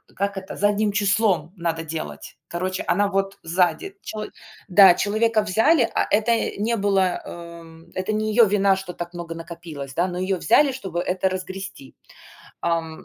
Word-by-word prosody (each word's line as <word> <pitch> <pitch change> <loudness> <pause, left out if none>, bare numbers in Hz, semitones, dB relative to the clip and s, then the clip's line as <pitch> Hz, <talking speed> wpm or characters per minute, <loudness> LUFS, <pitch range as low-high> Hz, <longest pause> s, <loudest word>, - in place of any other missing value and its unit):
как 200 0 -2
это 190 0 -7
задним 205 +1 +2
числом 195 -4 +1
надо 165 -1 -2
делать. 160 0 -7
Короче, 185 +2 -2
она 205 +2 +2
вот 195 0 -1
сзади 180 - 0
челы 215 -1 -5 0.4
Да, 195 0 +8
человека 215 +3 +1
взяли, 225 - +3
а - - +2
это, 225 0 0
не 230 +3 +1
было, 195 -3 +1
э, - - -8 0.3
м, 165 +1 -16
это 185 +3 -2
не 215 0 0
её 230 +1 +7
вина, 200 -1 +3
что 190 -1 -6
так 175 0 -7
много 170 -1 -6
накопилось, 165 -5 -8
да, 175 +2 +2
но 180 -1 -5
её 185 +1 0
взяли, 275 - +4
чтобы 190 -9 -4
это 185 +1 0
разгрести. 185 -5 -7 0.7
Ам, 165 -1 -2
190 Hz, 165 wpm, -23 LUFS, 175-210 Hz, 0.7 s, Да